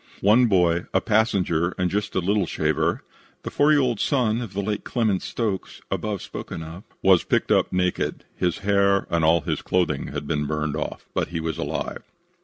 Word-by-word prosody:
"One 115 Hz, +5 st, +5 dB
boy, 90 Hz, -4 st, +2 dB
a -, -, +6 dB
passenger 95 Hz, -6 st, +1 dB
and 90 Hz, -1 st, 0 dB
just 105 Hz, 0 st, -2 dB
a -, -, +3 dB
little 100 Hz, 0 st, +1 dB
shaver 75 Hz, -1 st, 0 dB, 0.4 s
[the -, -, -5 dB
four 145 Hz, +1 st, +3 dB
year 150 Hz, -2 st, +5 dB
old 120 Hz, -5 st, 0 dB
son 120 Hz, -5 st, +1 dB
of 110 Hz, -5 st, -7 dB
the 100 Hz, +1 st, -2 dB
late 105 Hz, +1 st, -2 dB
Clement 110 Hz, -6 st, 0 dB
Stokes, 105 Hz, -6 st, -3 dB
above 105 Hz, -3 st, -2 dB
spoken 80 Hz, -, -7 dB
of] 80 Hz, +5 st, -9 dB, 0.2 s
was 95 Hz, -2 st, +5 dB
picked -, -, 0 dB
up -, -, +3 dB
naked. 90 Hz, 0 st, -1 dB
His 90 Hz, -2 st, 0 dB
hair 100 Hz, -1 st, +3 dB
and 85 Hz, -1 st, +1 dB
all 80 Hz, +1 st, +4 dB
his -, -, -2 dB
clothing 80 Hz, -6 st, 0 dB
had -, -, -5 dB
been 75 Hz, -1 st, -1 dB
burned 75 Hz, -1 st, -2 dB
off, -, -, -5 dB
but -, -, 0 dB
he 85 Hz, -, -4 dB
was 80 Hz, -1 st, -3 dB
alive. -, -, -3 dB
95 Hz, 195 wpm, -24 LUFS, 85-105 Hz, 0.4 s, a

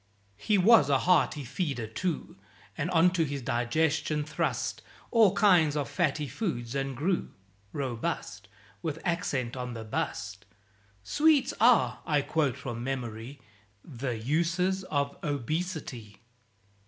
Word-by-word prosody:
He 210 Hz, -, +2 dB
was 185 Hz, -6 st, +6 dB
a 140 Hz, -, +4 dB
hearty 155 Hz, -2 st, +2 dB
feeder 135 Hz, -2 st, -3 dB
too, 155 Hz, +10 st, -3 dB, 0.4 s
And 160 Hz, -, -2 dB
onto 175 Hz, 0 st, +4 dB
his 140 Hz, -3 st, -4 dB
digestion 150 Hz, +5 st, 0 dB
thrust 150 Hz, +1 st, -2 dB, 0.3 s
All 220 Hz, -5 st, +5 dB
kinds 175 Hz, -8 st, +4 dB
of 145 Hz, -, -1 dB
fatty 150 Hz, -5 st, 0 dB
foods, 120 Hz, -, -3 dB
and 135 Hz, -2 st, -2 dB
grew 175 Hz, +6 st, 0 dB, 0.4 s
Robust 130 Hz, -5 st, -4 dB, 0.3 s
with 155 Hz, -2 st, -3 dB
accent 145 Hz, -9 st, -1 dB
on 125 Hz, -1 st, -5 dB
the 115 Hz, -, -6 dB
Bust. 100 Hz, -2 st, -4 dB, 0.6 s
("Sweets 295 Hz, -, +3 dB
are" 240 Hz, +2 st, +4 dB
I 150 Hz, -3 st, +2 dB
quote 145 Hz, -5 st, 0 dB
from 120 Hz, -4 st, -5 dB
memory 125 Hz, 0 st, -5 dB, 0.4 s
"The 125 Hz, -4 st, -4 dB
Uses 170 Hz, +9 st, 0 dB
of 140 Hz, -4 st, -1 dB
Obesity!") 145 Hz, -, -4 dB
145 Hz, 120 wpm, -29 LUFS, 125-175 Hz, 0.6 s, was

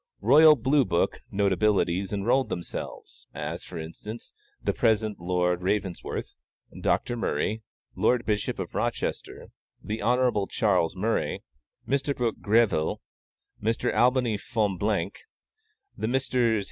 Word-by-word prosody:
"Royal 150 Hz, +7 st, +8 dB
Blue 135 Hz, +3 st, +3 dB
Book" 85 Hz, -7 st, 0 dB
notabilities 100 Hz, -1 st, +1 dB
enrolled 115 Hz, +6 st, +1 dB
themselves; 85 Hz, -, -7 dB
as, 80 Hz, +3 st, -4 dB
for 90 Hz, -, -9 dB
instance, 85 Hz, +8 st, -8 dB, 0.3 s
the -, -, -1 dB
present 110 Hz, -2 st, +1 dB
Lord 90 Hz, 0 st, 0 dB
Ravensworth, 95 Hz, -1 st, -2 dB, 0.5 s
Dr. 120 Hz, -, +1 dB
Murray, 110 Hz, 0 st, -1 dB, 0.3 s
Lord 125 Hz, -1 st, +2 dB
Bishop 105 Hz, -1 st, -1 dB
of -, -, -5 dB
Rochester, -, -, -3 dB, 0.3 s
the 110 Hz, +1 st, -5 dB
Honorable 120 Hz, -5 st, +2 dB
Charles 95 Hz, -5 st, +1 dB
Murray, 110 Hz, +5 st, -1 dB, 0.4 s
Mr. 140 Hz, +2 st, 0 dB
Brooke 120 Hz, -2 st, -1 dB
Greville, 105 Hz, -7 st, +2 dB, 0.6 s
Mr. 115 Hz, +3 st, 0 dB
Albany 125 Hz, -4 st, +3 dB
Fonblanque, 105 Hz, -3 st, -1 dB, 0.8 s
the -, -, -3 dB
Messrs. 130 Hz, +3 st, -1 dB
105 Hz, 110 wpm, -27 LUFS, 95-120 Hz, 0.8 s, Royal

